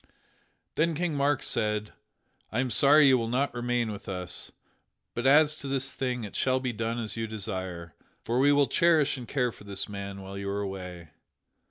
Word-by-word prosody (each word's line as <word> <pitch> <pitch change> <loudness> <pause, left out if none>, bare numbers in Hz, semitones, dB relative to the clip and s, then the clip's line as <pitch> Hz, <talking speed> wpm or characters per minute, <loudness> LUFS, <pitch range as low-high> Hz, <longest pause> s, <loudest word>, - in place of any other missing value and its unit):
Then 165 +1 +2
King 170 0 -1
Mark 140 -1 +1
said: 105 0 -1 0.6
"I 110 - -1
am 130 -1 0
sorry 145 +7 +6
you 130 -2 +5
will 115 - -2
not 130 +4 0
remain 120 -2 -1
with 100 - -8
us, 90 -1 -4 0.6
but 120 +2 -1
as 150 +2 +6
to 140 - -7
this 135 0 0
thing 125 -3 -2
it 105 - -8
shall 130 0 +2
be 130 -2 -2
done 115 +1 -2
as 110 -2 -3
you 115 0 -2
desire, 95 -5 -5 0.3
for 120 +2 0
we 140 +2 +5
will 145 0 +5
cherish 160 -1 +3
and 125 -3 -8
care 125 -3 0
for - - -15
this 100 -1 -3
man 100 -1 -6
while 95 +1 -7
you 100 0 -4
are 100 +1 -2
away." 90 -4 -6
120 Hz, 195 wpm, -28 LUFS, 100-135 Hz, 0.6 s, sorry